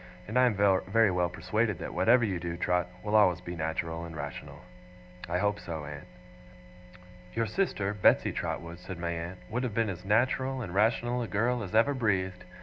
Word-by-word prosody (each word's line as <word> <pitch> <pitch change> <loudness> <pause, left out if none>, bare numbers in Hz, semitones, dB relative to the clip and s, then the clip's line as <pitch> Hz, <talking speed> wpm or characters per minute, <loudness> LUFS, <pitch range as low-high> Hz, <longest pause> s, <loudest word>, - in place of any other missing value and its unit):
And 110 - -6
I 125 0 +6
am 115 - +1
very 100 +2 +3
well 90 -1 +1
persuaded 100 +5 -1
that - - -6
whatever 120 0 +4
you 95 -5 -2
do, 85 0 -4
Trot, 90 0 +1 0.2
will 105 0 -1
always 90 -4 +5
be 90 -1 -7
natural 80 +1 -3
and 85 -1 -8
rational.' 75 -1 -7 0.7
'I 90 - +1
hope 105 +2 0
so, 80 -3 -6
aunt.' 75 +3 -8 1.3
'Your 115 0 +1
sister, 105 - -1
Betsey 105 - +4
Trotwood,' 85 +1 -4
said 95 0 -8
my 85 0 -2
aunt, 85 +2 -5
'would 125 +3 -1
have 125 -5 -3
been 115 -2 +1
as 90 -1 -8
natural 130 +6 +1
and 90 -5 -6
rational 120 +4 +2
a 115 - -3
girl 120 +4 0
as 100 0 -5
ever 115 +6 +4
breathed. 95 -7 -1
100 Hz, 190 wpm, -29 LUFS, 85-115 Hz, 1.3 s, I